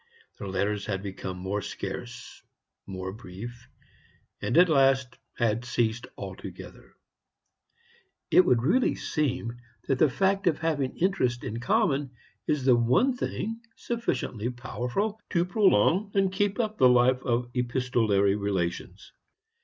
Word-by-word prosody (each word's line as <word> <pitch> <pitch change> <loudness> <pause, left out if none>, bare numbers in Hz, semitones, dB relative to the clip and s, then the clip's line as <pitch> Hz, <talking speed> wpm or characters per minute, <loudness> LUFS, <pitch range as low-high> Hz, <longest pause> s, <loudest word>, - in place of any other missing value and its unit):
Their 100 - -5
letters 100 +2 -1
had 95 -1 -2
become 95 -2 -5
more 95 +3 -3
scarce, - - -7 0.5
more 95 -1 -5
brief, 115 +4 -10 0.7
and - - 0
at 180 +1 +8
last 135 -4 +2 0.2
had 115 -1 0
ceased 120 -1 -1
altogether. - - -9 1.4
It 185 - +7
would 125 -9 +2
really 240 - +2
seem 130 -6 -2 0.3
that 135 -2 +1
the 155 - +5
fact 195 +5 +1
of 160 - +3
having 155 -5 -1
interests 125 -10 0
in 115 -1 -4
common 145 - +1 0.4
is 145 -4 0
the 130 -2 +6
one 130 - +3
thing 225 -2 -4
sufficiently 130 - -2
powerful 125 - -3
to 170 -1 +1
prolong 190 - +3
and 195 -1 +2
keep 200 +3 0
up 215 -2 -1
the 130 - +7
life 125 +1 +4
of 120 -1 -1
epistolary 120 -6 +1
relations. 95 -4 -3
125 Hz, 130 wpm, -27 LUFS, 110-175 Hz, 1.4 s, at